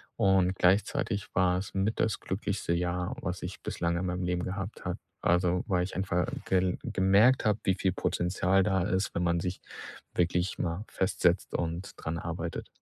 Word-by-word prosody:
Und 95 -1 +3
gleichzeitig 100 +2 +1
war 90 -1 +3
es 95 - -7
mit 100 +3 0
das 110 -2 +1
glücklichste 95 -2 -2
Jahr, 90 +1 -1
was 90 0 -4
ich 90 +2 -6
bislang 85 0 -1
in 90 +1 -1
meinem 90 +1 -2
Leben 90 0 -1
gehabt 95 +2 -5
habe. - - -2 0.2
Also, 90 0 +2
weil 90 -3 +2
ich 95 - -5
einfach 90 -2 0 0.2
gel 95 -1 +1
gemerkt 100 +7 +4
habe, 105 0 +2
wie 95 - +2
viel 95 0 +1
Potenzial 90 +1 +1
da 95 -2 +1
ist, 95 0 0
wenn 90 - -1
man 85 0 +2
sich 90 +2 -3 0.5
wirklich 90 +1 +1
mal 90 +4 -2
festsetzt 90 -2 +1
und 85 +4 -2
dran 80 +1 -3
arbeitet. 85 0 -4
90 Hz, 175 wpm, -29 LUFS, 90-95 Hz, 0.5 s, gemerkt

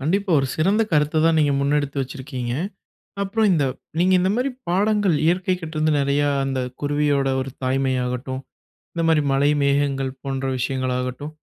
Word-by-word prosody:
கண்டிப்பா. 190 +7 0
ஒரு 135 - -1
சிறந்த 195 +8 +2
கருத்த 150 +1 +2
தான் 165 -1 +3
நீங்க 145 -2 +3
முன்னெடுத்து 145 0 0
வச்சிருக்கீங்க. 130 -2 -5 0.7
அப்புறம் 210 +2 +1
இந்த 150 - +2 0.4
நீங்க 185 +2 +4
இந்த 185 +1 +1
மாரி 255 +3 0 0.2
பாடங்கள் 205 -1 +2
இயற்கைகிட்ட 180 -1 0
இருந்து 155 0 +2
நெறையா 140 +1 +1 0.2
அந்த 135 -1 -2 0.2
குருவியோட 145 -1 +1
ஒரு 135 - -5
தாய்மையாகட்டும், 130 0 -1 0.5
இந்த 170 - -2
மாரி 155 -2 +4
மழை 140 +2 +3
மேகங்கள் 140 -1 +1
போன்ற 135 -1 -3
விஷயங்களாகட்டும், 130 +2 -2
145 Hz, 140 wpm, -22 LUFS, 135-165 Hz, 0.7 s, நீங்க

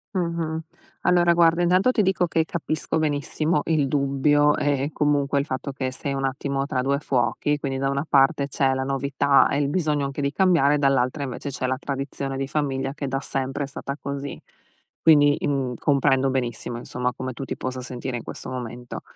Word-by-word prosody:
Mh-mh, 165 -2 -2 0.4
allora 175 -1 +4
guarda, 170 0 +4
intanto 185 +8 +4
ti 220 - +2
dico 190 -2 +2
che 160 0 +1
capisco 155 -2 -2
benissimo 155 +1 0
il 150 -4 +1
dubbio, 145 +1 +3
eh 140 -2 0
eh, 150 - -2
comunque 145 -1 +1
il 140 - -1
fatto 135 -1 -4
che 130 -1 -3
sei 140 +1 -4
un 135 0 -2
attimo 135 +1 -1
tra 130 -2 -1
2 140 +2 0
fuochi, 140 +2 0
quindi, 135 -2 -3
da 135 0 0
una 140 +2 -1
parte 140 0 +3
c'è 135 -1 +1
la 130 0 -1
novità 140 +1 +2
e 140 - 0
il 145 -1 +1
bisogno 150 -3 0
anche 140 +1 -4
di 140 0 0
cambiare, 165 -7 +3
dall'altra 135 0 +1
invece 140 +2 -5
c'è 130 -1 -3
la 130 - 0
tradizione 135 -1 -4
di 135 0 -2
famiglia 135 -2 -1
che 140 -2 -4
da 135 0 -1
sempre 135 +1 -3
è - - -10
stata 140 +1 -6
così. 140 0 -5 0.6
Quindi, 145 -2 +6
mhmm, 135 -3 -1
comprendo 135 -2 +2
benissimo, 120 -2 -3
insomma, 125 +1 -3
come 130 +1 -5
tu 135 - -6
ti - - -5
possa 130 0 -4
sentire 125 0 -5
in 120 - -5
questo - - -8
momento. 125 -1 -6
140 Hz, 195 wpm, -24 LUFS, 135-150 Hz, 0.6 s, Quindi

